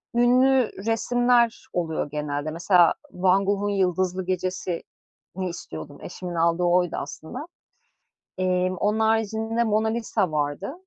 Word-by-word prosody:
ünlü 255 +1 +4
resimler 235 +1 +2
oluyor 160 -4 -2
genelde 150 0 -3
mesela 175 +1 +4 0.2
Van 190 +2 +2
Gogh'un 200 +1 0
Yıldızlı 185 -1 0
Gecesi'ni 185 0 -5
istiyordum, 145 - -8
eşimin 180 0 -7
aldığı 170 +1 +2
oydu 175 0 +2
aslında. 150 +2 -7 1.0
Emm, 185 0 +1
onun 210 +4 0
haricinde 225 +1 +1
Mona 220 0 +1
Lisa 220 -6 -1
vardı. 145 - -2
185 Hz, 110 wpm, -24 LUFS, 175-220 Hz, 1.0 s, ünlü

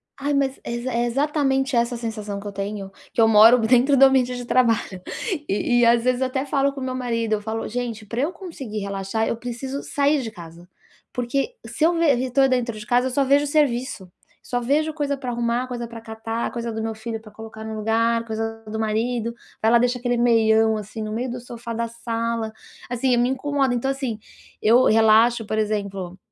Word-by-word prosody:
Ai, 285 +1 -2
mas 275 -1 0
exa 240 +2 -3
exatamente 270 +2 +1
essa 235 +1 +2
a - - -5
sensação 215 -3 -5
que 205 - -8
eu - - -4
tenho, 200 0 -5 0.2
que - - +2
eu 225 - +6
moro 225 +3 +7
dentro 250 +5 +4
do 270 - +6
ambiente 255 -2 +3
de 245 0 -6
trabalho, 230 -7 +1 0.5
e 240 +4 +1
e - - +5
às 235 0 +4
vezes 255 +1 +1
eu 260 - +2
até 265 +1 -2
falo 275 0 +1
com 275 - -7
meu 255 0 -3
marido, 230 -3 -1
eu 210 - 0
falo: 220 +1 -4
"Gente, 230 -2 -4
pra 230 +4 -3
eu 305 +6 0
conseguir 300 - -7
relaxar, 200 +2 -2
eu 230 - -1
preciso 250 +3 -5
sair 285 0 +1
de 225 - -5
casa", 170 -2 -12 0.5
porque 270 - -2
se 310 - -3
eu 340 +2 +5
ve 335 0 +1 0.2
estou 265 +1 +3
dentro 240 -3 0
de 210 - -9
casa, 245 +3 +2
eu 260 - -3
só 275 +2 +2
vejo 280 +2 +3
serviço, 260 - 0 0.3
só 245 - -2
vejo 290 +6 +1
coisa 290 -2 -1
pra 255 -2 -5
arrumar, 240 +1 -1
coisa 240 -2 -5
pra 230 -1 -9
catar, 225 +1 -4
coisa 235 -1 -4
do 220 0 -4
meu 225 0 -3
filho 225 0 -5
pra 215 -1 -14
colocar 220 0 -10
no 220 0 -5
lugar, 230 +2 +1
coisa 225 0 -4
do 220 +1 -4
marido. 230 +2 -1 0.3
Vai 220 - +3
lá, 235 - +6
deixa 245 +1 +1
aquele 245 0 0
meião 225 -2 +4
assim 215 +2 -7
no 215 - -4
meio 245 +4 -2
do 245 +1 -5
sofá 235 -1 -7
da 230 +1 -2
sala. 230 -1 -3 0.4
Assim, 245 +1 +1
me 240 - +3
incomoda. 270 -1 0
Então 265 +3 0
assim, 265 -5 -3 0.4
eu 240 +4 +5
relaxo, 225 +1 +4
por 215 - -2
exemplo, 200 -4 -2
235 Hz, 210 wpm, -23 LUFS, 220-260 Hz, 0.5 s, moro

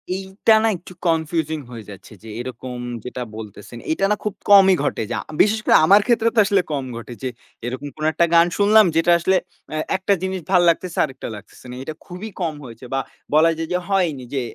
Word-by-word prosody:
এইটা 190 +3 +1
না - - +3
একটু 180 +2 -14
কনফিউজিং 160 -1 0
হয়ে 115 -2 -8
যাচ্ছে, 100 +2 -12
যে 115 - -10
এরকম 125 0 -6 0.3
যেটা 125 0 -5
বলতেছেন, 105 +1 -10
এইটা 195 +5 +1
না - - +3
খুব 210 - -2 0.2
কমই 195 -2 +8
ঘটে। 145 - -1
যা - - -1 0.2
বিশেষ 215 +1 +3
করে - - +5
আমার 200 +5 +6
ক্ষেত্রে 230 -2 +3
তো - - +4
আসলে 200 -1 +3
কম 140 -3 -2
ঘটে 120 +1 -8
যে 130 - -1 0.4
এরকম 130 +4 -5
কোনো 155 0 -2
একটা 170 - +3
গান 170 +1 +6
শুনলাম 210 +1 +6
যেটা 165 +1 +3
আসলে 190 +3 +2 0.4
আ - - -3 0.2
একটা 190 +2 +1
জিনিস 190 -1 -2
ভাল 180 -2 +5
লাগতেছে 170 +1 -1
আরেকটা 135 -3 -8
লাগতেছে 105 +4 -14
না। - - -7
এইটা 145 +4 -6
খুবই 180 +5 -8
কম 165 -3 -1
হয়েছে 120 -1 -11
বা 135 - +1 0.3
বলা 160 +2 +5
যায় 165 0 -3
যে - - +2
হয়নি। 175 -9 0
যে 135 - 0
165 Hz, 205 wpm, -21 LUFS, 130-190 Hz, 0.4 s, কমই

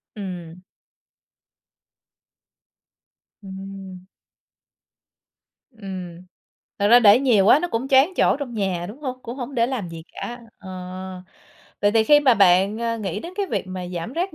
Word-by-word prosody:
Ừm. 180 -4 -8 2.8
Ừm. 190 -1 -9 1.7
Ừm. 185 -6 -8 0.6
Thật 205 - +2
ra 240 +2 +8
để 210 -1 +7
nhiều 240 -8 +3
quá 260 - +7
nó 350 +3 -3
cũng 250 -1 -3
choán 270 +3 +5
chỗ - - +3
trong 265 -5 -6
nhà, 190 -5 -2
đúng 230 +8 -11
hông? 255 -3 -5
Cũng 235 +2 -7
hổng 270 +1 -6
để 230 -2 +2
làm 240 -8 -4
gì 165 -1 -9
cả. 240 +1 -7 0.2
Ờ, 190 - -12 1.1
vậy 205 - +3
thì 220 0 +3
khi 295 +5 +6
mà 265 -4 +4
bạn, 195 +1 +4
ơ, 230 0 -2
nghĩ 205 -1 -4
đến 340 - -8
cái 400 -1 -1
việc 205 - -3
mà 185 -1 -6
giảm 175 +4 -5
rác 345 +3 -3
210 Hz, 150 wpm, -22 LUFS, 190-255 Hz, 2.8 s, ra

